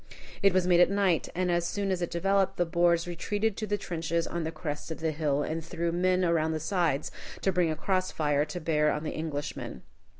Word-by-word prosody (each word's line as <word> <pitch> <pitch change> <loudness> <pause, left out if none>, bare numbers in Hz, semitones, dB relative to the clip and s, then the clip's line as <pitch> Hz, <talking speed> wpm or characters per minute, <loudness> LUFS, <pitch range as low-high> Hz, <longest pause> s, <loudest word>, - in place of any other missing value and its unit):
It 195 -1 +5
was 185 -1 +2
made 175 -1 +4
at 175 - +6
night, 195 -4 +1
and 180 0 +1
as 175 0 +1
soon 200 -1 -1
as 185 -1 -1
it 175 - -1
developed, 195 +2 +1
the 175 - +2
Boers 170 0 +2
retreated 205 +5 -1
to 215 - -3
the 205 +1 0
trenches 170 -3 -2
on 170 -1 -3
the 160 - -2
crest 150 -2 -5
of 160 - -5
the 160 0 0
hill, 145 -2 0
and 160 +2 -3
threw 170 +1 -2
men 180 +1 +2
around 160 -2 +2
the 155 - -2
sides 160 -4 0 0.3
to 195 - +3
bring 180 -2 +2
a 155 - -1
cross 185 +3 0
fire 145 -2 +1
to 155 +3 -5
bear 150 -2 +2
on 150 - -2
the 155 - -4
Englishmen. 145 -6 -5
170 Hz, 230 wpm, -29 LUFS, 155-185 Hz, 0.3 s, at